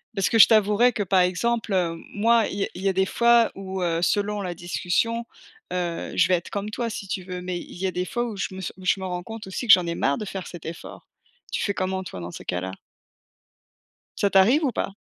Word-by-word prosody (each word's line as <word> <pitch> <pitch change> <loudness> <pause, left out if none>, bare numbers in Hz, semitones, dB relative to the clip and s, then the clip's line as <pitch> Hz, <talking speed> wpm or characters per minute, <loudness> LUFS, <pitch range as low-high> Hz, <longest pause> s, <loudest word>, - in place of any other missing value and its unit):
Parce 195 -2 +1
que 225 - +2
je - - +11
t'avouerais 215 +3 +4
que 210 - -1
par 190 0 +2
exemple, 215 +6 0
heu, 175 -3 +1 0.2
moi 225 +1 +3
il - - -6
y 200 - 0
a - - -1
il 180 - -8
y 195 - +2
a - - 0
des 190 +1 +2
fois 235 +3 +4
où, 190 -1 -5
heu, 165 -1 0
selon 205 +3 0
la 180 -2 -4
discussion, 180 +7 -1 0.4
heu, 175 -2 -3
je 170 - +5
vais 185 - +2
être 175 - -5
comme 205 +1 -4
toi 235 +2 -2
si 205 -2 -6
tu 190 - -3
veux, 180 0 -6
mais 180 -1 -3
il - - -11
y 190 - -3
a 190 - 0
des 180 0 -2
fois 240 +5 -2
où 225 -3 -5
je 195 - -2
me - - -7
s 190 - -5
où 185 - -12
je 195 - +2
me 190 - -5
rends 180 -1 -3
compte 225 +4 -8
aussi 190 +6 -5
que 220 - +10
j'en 180 -1 +5
ai 170 - -2
marre 140 -4 0
de 215 - -5
faire 190 -2 -6
cet 175 -3 -10
effort. 165 +1 -9 0.4
Tu - - -1
fais 200 - -1
comment 190 0 -2
toi 90 - -8
dans 85 +1 -6
ces - - -10
cas-là? 90 +1 -3 1.5
Ça 200 - +4
t'arrive 225 +12 +5
ou 265 - +1
pas? - - -2
190 Hz, 265 wpm, -24 LUFS, 180-215 Hz, 1.5 s, je